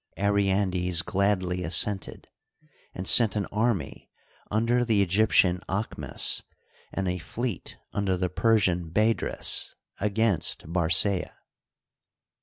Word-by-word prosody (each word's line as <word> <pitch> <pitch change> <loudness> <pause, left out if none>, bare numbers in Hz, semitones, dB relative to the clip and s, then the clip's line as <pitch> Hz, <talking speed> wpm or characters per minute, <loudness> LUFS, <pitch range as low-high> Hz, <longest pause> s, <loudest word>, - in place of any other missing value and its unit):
Aryandes 95 -3 +1
gladly 95 -2 -1
assented, 95 +4 0 0.7
and 95 +1 -5
sent 115 -4 +5
an 105 -2 -1
army 105 -8 -2 0.4
under 115 +3 +1
the 110 -4 +2
Egyptian 95 -2 +2
Aahmes 105 +3 -1 0.5
and 95 -1 -3
a 90 0 -2
fleet 115 +5 -5 0.2
under 95 -2 -1
the 90 0 -1
Persian 95 -7 +1
Badres 110 +6 +1 0.2
against 105 -3 0
Barcaea. 90 +2 +1
100 Hz, 95 wpm, -26 LUFS, 90-105 Hz, 0.7 s, sent